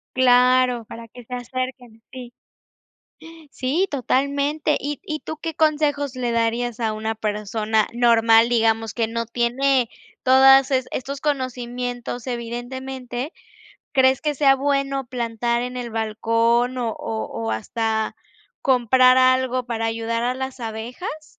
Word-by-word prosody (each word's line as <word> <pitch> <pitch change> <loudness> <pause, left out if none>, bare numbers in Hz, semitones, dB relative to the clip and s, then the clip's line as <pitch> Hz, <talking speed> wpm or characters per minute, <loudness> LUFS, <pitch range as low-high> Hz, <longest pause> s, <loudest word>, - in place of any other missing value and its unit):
Claro, 250 -1 +4
para 230 0 -10
que 245 0 -13
se 250 - -9
acerquen, 250 -2 -5
sí. 245 -2 -9 1.2
Sí, 295 +10 -1
totalmente. 280 +3 0
¿Y 290 -1 -5
y 310 0 -3
tú 315 - -7
qué 325 0 -5
consejos 290 -3 +1
le 245 -2 -1
darías 235 +1 -1
a 220 -2 0
una 220 +1 -3
persona 215 0 -1
normal?, 230 -1 +4
digamos, 225 -2 +1
que 230 -2 -1
no 230 +1 -2
tiene 245 +2 +1 0.3
todas 270 +1 +6
es 260 -1 0
estos 275 +2 -5
conocimientos, 245 -3 -3
evidentemente. 250 +3 -5 0.6
¿Crees 265 -1 +4
que 300 -1 -1
sea 275 -1 +4
bueno 275 -1 -1
plantar 235 -1 -1
en 250 0 -5
el 245 -1 -5
balcón, 230 +2 +1
o 240 -2 -1
o 110 - -4 0.2
o, 110 - -2
hasta 220 - -2 0.5
comprar 255 0 +4
algo 255 -1 +3
para 230 -1 -2
ayudar 230 +1 -2
a 250 +1 0
las 265 0 -6
abejas? 240 - -6
245 Hz, 130 wpm, -22 LUFS, 230-265 Hz, 1.2 s, todas